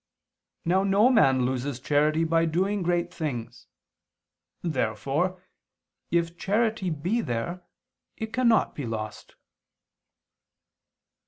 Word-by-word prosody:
Now 185 Hz, +3 st, +3 dB
no 200 Hz, +5 st, +4 dB
man 130 Hz, -, +4 dB
loses 130 Hz, +1 st, -2 dB
charity 150 Hz, +4 st, +2 dB
by 165 Hz, 0 st, +2 dB
doing 190 Hz, +5 st, 0 dB
great 175 Hz, 0 st, 0 dB
things. 120 Hz, -8 st, -5 dB, 1.0 s
Therefore 150 Hz, -, -1 dB, 0.7 s
if 170 Hz, 0 st, 0 dB
charity 215 Hz, -1 st, 0 dB
be 175 Hz, +9 st, -1 dB
there, 170 Hz, -, -3 dB, 0.6 s
it 220 Hz, 0 st, -5 dB
cannot 235 Hz, -2 st, +3 dB
be 140 Hz, -5 st, -5 dB
lost. 110 Hz, -1 st, -6 dB
170 Hz, 95 wpm, -26 LUFS, 135-190 Hz, 1.0 s, no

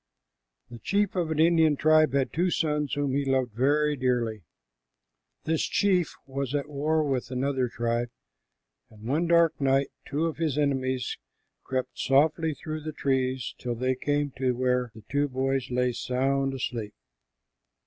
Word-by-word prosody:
The 120 Hz, -, -9 dB
chief 200 Hz, -, 0 dB
of 175 Hz, -3 st, 0 dB
an 160 Hz, -, -2 dB
Indian 160 Hz, -1 st, +4 dB
tribe 155 Hz, -1 st, +4 dB
had 140 Hz, -2 st, 0 dB
two 175 Hz, +3 st, +1 dB
sons 150 Hz, -4 st, 0 dB
whom 145 Hz, -2 st, -1 dB
he 140 Hz, +1 st, +1 dB
loved 130 Hz, -3 st, 0 dB
very 145 Hz, +5 st, +2 dB
dearly. 120 Hz, -5 st, 0 dB, 1.0 s
This 160 Hz, 0 st, 0 dB
chief 185 Hz, -4 st, +1 dB
was 135 Hz, 0 st, -3 dB
at 145 Hz, 0 st, -1 dB
war 150 Hz, +2 st, 0 dB
with 135 Hz, -4 st, -2 dB
another 130 Hz, 0 st, 0 dB
tribe, 120 Hz, 0 st, -1 dB, 0.8 s
and 105 Hz, -1 st, -16 dB
one 150 Hz, +9 st, 0 dB
dark 170 Hz, -2 st, +3 dB
night 135 Hz, 0 st, +2 dB, 0.2 s
two 150 Hz, +3 st, -1 dB
of 165 Hz, -, -2 dB
his 155 Hz, -4 st, -1 dB
enemies 130 Hz, -3 st, -1 dB, 0.4 s
crept 130 Hz, -1 st, -3 dB
softly 155 Hz, +3 st, +2 dB
through 155 Hz, +1 st, -6 dB
the 155 Hz, 0 st, -5 dB
trees 130 Hz, -3 st, -1 dB
till 120 Hz, -1 st, -3 dB
they 130 Hz, +2 st, 0 dB
came 145 Hz, +2 st, -1 dB
to 130 Hz, -1 st, +1 dB
where 125 Hz, -1 st, 0 dB
the 110 Hz, -, -12 dB
two 145 Hz, +1 st, +1 dB
boys 135 Hz, 0 st, -1 dB
lay 125 Hz, 0 st, +1 dB
sound 135 Hz, +2 st, 0 dB
asleep. 115 Hz, -5 st, -4 dB
135 Hz, 155 wpm, -27 LUFS, 130-155 Hz, 1.0 s, Indian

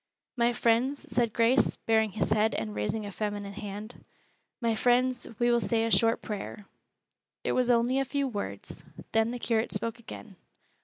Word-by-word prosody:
"My 240 Hz, -1 st, +3 dB
friends," 240 Hz, +4 st, +1 dB
said 235 Hz, -1 st, +2 dB
Grace, 235 Hz, +4 st, +3 dB
baring 220 Hz, -2 st, +2 dB
his 215 Hz, -, -1 dB
head 220 Hz, +1 st, +3 dB
and 110 Hz, -2 st, -3 dB
raising 105 Hz, -, -2 dB
a 200 Hz, -, -6 dB
feminine 205 Hz, 0 st, -4 dB
hand, 210 Hz, +3 st, -7 dB, 0.6 s
"My 230 Hz, -2 st, +1 dB
friends, 245 Hz, +2 st, +2 dB
we 240 Hz, 0 st, +3 dB
will 235 Hz, 0 st, +3 dB
say 225 Hz, -1 st, +1 dB
a 230 Hz, -, -1 dB
short 230 Hz, +1 st, +3 dB
prayer." 210 Hz, 0 st, -6 dB, 0.8 s
It -, -, 0 dB
was 250 Hz, -1 st, +1 dB
only 245 Hz, +2 st, +3 dB
a -, -, +2 dB
few 275 Hz, +1 st, -1 dB
words. 210 Hz, -5 st, -6 dB, 0.3 s
Then 225 Hz, 0 st, +3 dB
the 245 Hz, -, -3 dB
curate 230 Hz, -1 st, 0 dB
spoke 230 Hz, 0 st, -3 dB
again. 215 Hz, -3 st, -10 dB
230 Hz, 170 wpm, -29 LUFS, 215-245 Hz, 0.8 s, My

